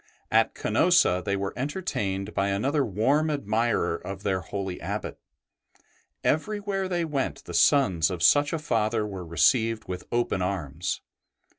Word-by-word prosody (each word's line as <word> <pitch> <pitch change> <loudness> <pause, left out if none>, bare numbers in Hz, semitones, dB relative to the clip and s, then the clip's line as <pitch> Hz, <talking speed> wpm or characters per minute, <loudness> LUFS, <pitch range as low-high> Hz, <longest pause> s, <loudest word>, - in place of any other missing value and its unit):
At - - +3
Canosa* 90 +1 +3
they 100 - 0
were 100 0 -3
enter 145 +8 -3
tained 95 - -2
by 100 - +1
another 135 +9 +1
warm 135 +10 +1
admirer 115 - 0
of 95 +3 -7
their 95 -2 0
holy 95 +1 -5
Abbot; - - -4 1.0
everywhere 200 +3 -1
they 175 -2 -1
went 145 -4 -2
the 85 - -9
sons 95 - +4
of 90 -3 -4
such 145 +10 +5
a 165 - 0
Father 110 -6 0
were 95 -3 -6
received 110 +6 +2
with 90 -1 -6
open 120 -5 0
arms. 90 -2 -3
105 Hz, 145 wpm, -26 LUFS, 95-145 Hz, 1.0 s, such